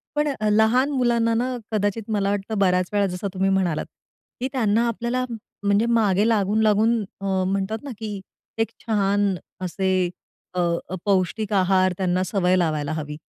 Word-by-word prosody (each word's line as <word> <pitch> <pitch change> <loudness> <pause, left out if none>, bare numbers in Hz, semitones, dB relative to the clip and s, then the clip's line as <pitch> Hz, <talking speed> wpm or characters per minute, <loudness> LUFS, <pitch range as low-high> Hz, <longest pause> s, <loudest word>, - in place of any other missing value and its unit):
पण 295 0 +1
अ, 215 0 +1
लहान 220 +6 +3
मुलांना 235 -3 +2
ना, 250 +2 0 0.2
कदाचित 210 +1 -1
मला 200 -2 +1
वाटतं, 205 +1 -2
बऱ्याच 180 -2 +2
वेळा 205 -1 +3
जसं 180 +2 -4
तुम्ही 190 +1 +1
म्हणालात, 180 -5 +1 0.5
की 255 - -1
त्यांना 230 -2 +2
आपल्याला 240 +2 -1 0.4
म्हणजे 205 +3 +3
मागे 205 0 +3
लागून-लागून 215 +1 +3 0.2
अ, - - -4 0.2
म्हणतात 200 +4 -2
ना, 280 - -6
की 210 -3 -4 0.4
एक 225 - +1 0.2
छान 200 -2 +1 0.3
असे, 185 0 0 0.4
अ, 180 - -2 0.5
पौष्टिक 200 +2 0
आहार 185 -1 +3
त्यांना 185 -1 +1
सवय 185 -2 +1
लावायला 155 -4 0
हवी. 150 -1 -5
205 Hz, 150 wpm, -23 LUFS, 185-225 Hz, 0.5 s, लहान